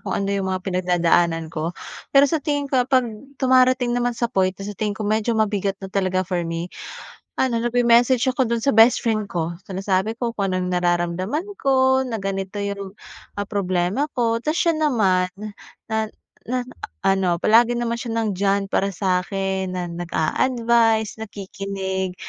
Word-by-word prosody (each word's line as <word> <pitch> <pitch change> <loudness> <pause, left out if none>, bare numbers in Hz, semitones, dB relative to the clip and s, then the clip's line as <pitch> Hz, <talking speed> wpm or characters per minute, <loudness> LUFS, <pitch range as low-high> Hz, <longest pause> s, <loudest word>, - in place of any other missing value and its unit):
kung - - -3
ano 195 - -1
'yung 195 -1 -1
mga 185 -1 -3
pinagdadaanan 175 -3 +1
ko. 165 +2 -3 0.3
Pero 275 0 +6
sa 310 +2 0
tingin 290 0 -1
ko, 260 - +4
'pag 260 -2 +4 0.3
dumarating 255 -1 +3
naman 245 0 0
sa 235 - -1
point 185 -2 +1
na 195 - -8
sa 205 - -5
tingin 205 0 -3
ko 215 - -4
medyo 220 +2 0
mabigat 205 -2 0
na 190 - -8
talaga 185 -1 0
for 180 -1 -2
me, 165 +2 -4 0.7
ano 255 -3 +1
nag-me-message 240 +1 +3
ako 260 0 +1
do'n 235 0 -1
sa 280 - +1
bestfriend 225 -2 +4
ko. 170 -3 -3
Sinasabi 190 +2 -1
ko 240 - +1
kung 195 -2 0
anong 185 0 -1
nararamdaman 180 - -1
ko, 265 -1 +3
na 225 -4 -4
ganito 195 +1 -3
'yung, 200 -1 -4 0.4
ah, 205 0 -4
problema 190 +4 0
ko. 230 -2 +1
Tas 300 +6 -2
siya 335 -1 +1
naman, 195 -12 +2 0.6
na 220 -1 -1 0.3
na 250 +1 -1 0.4
ano, 190 -2 +2
palagi 235 +2 +5
naman 235 -1 -2
siya 235 -2 -4
nandiyan 200 -1 0
para 195 - +1
sa'kin, 190 0 -1
na 180 - -2
nag-a-advice, 225 +6 +1
nakikinig, 195 -3 -4
200 Hz, 160 wpm, -22 LUFS, 185-240 Hz, 0.7 s, Pero